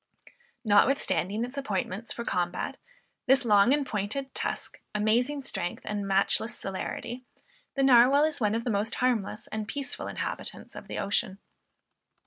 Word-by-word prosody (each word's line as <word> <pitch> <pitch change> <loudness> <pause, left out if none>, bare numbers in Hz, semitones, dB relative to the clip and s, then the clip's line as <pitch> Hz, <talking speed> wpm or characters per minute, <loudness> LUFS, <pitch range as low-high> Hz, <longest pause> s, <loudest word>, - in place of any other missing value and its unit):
Notwithstanding 215 -1 +3
its 260 +3 -6
appointments 210 -2 -3
for 235 - -4
combat, 175 -1 -1 0.5
this 265 0 +5
long 210 +1 +5
and 285 0 +2
pointed 225 +5 -3
tusk, - - -4
amazing 245 +7 +1
strength, 175 -9 -3
and 205 -1 -3
matchless 195 +4 +1
celerity, 235 +5 -5 0.5
the 275 - +2
Narwal 265 +2 +7
is 310 -4 -4
one 210 0 +2
of 230 - -1
the 240 - -1
most 210 +2 0
harmless 225 -4 0
and 215 -1 -3
peaceful 280 +2 -4
inhabitants - - -5
of - - -9
the - - -5
ocean. 195 -1 0
225 Hz, 140 wpm, -28 LUFS, 205-265 Hz, 0.5 s, Narwal